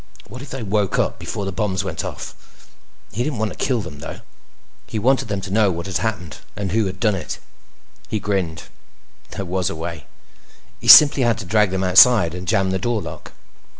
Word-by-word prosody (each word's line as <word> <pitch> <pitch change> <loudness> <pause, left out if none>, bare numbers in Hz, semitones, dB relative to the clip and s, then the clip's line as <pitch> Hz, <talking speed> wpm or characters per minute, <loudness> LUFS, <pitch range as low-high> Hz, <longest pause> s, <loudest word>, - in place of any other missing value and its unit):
What 125 +4 -10
if 140 - -10
they 135 -3 -6
woke 105 -1 0
up - - -1
before 100 - -5
the 95 - -3
bombs 95 -1 -2
went - - -4
off? - - -7 0.8
He 120 - -2
didn't 140 -2 -3
want 110 0 -2
to - - -9
kill 125 -4 0
them 75 -7 -9
though. - - -8 0.7
He - - -5
wanted 130 +3 +1
them 100 -2 -3
to 95 - -7
know 105 -2 +3
what 85 -1 -5
had 95 -2 -2
happened 100 -8 -4 0.2
and 100 -3 -4
who 110 0 +1
had 95 - -7
done 110 -3 +2
it. 95 - -5 0.7
He 110 - -2
grinned. 95 -6 -2 0.7
There 100 - -4
was 95 +1 -1
a 95 - -5
way. 80 - -7 0.7
He - - -8
simply 145 -2 +9
had 120 -2 +2
to 105 - -7
drag 105 +1 +2
them 95 0 -2
outside 95 -1 +6
and 90 0 -7
jam 95 +2 +1
the 95 - -1
door 120 -2 -1
lock. - - -9
100 Hz, 210 wpm, -20 LUFS, 95-110 Hz, 0.8 s, simply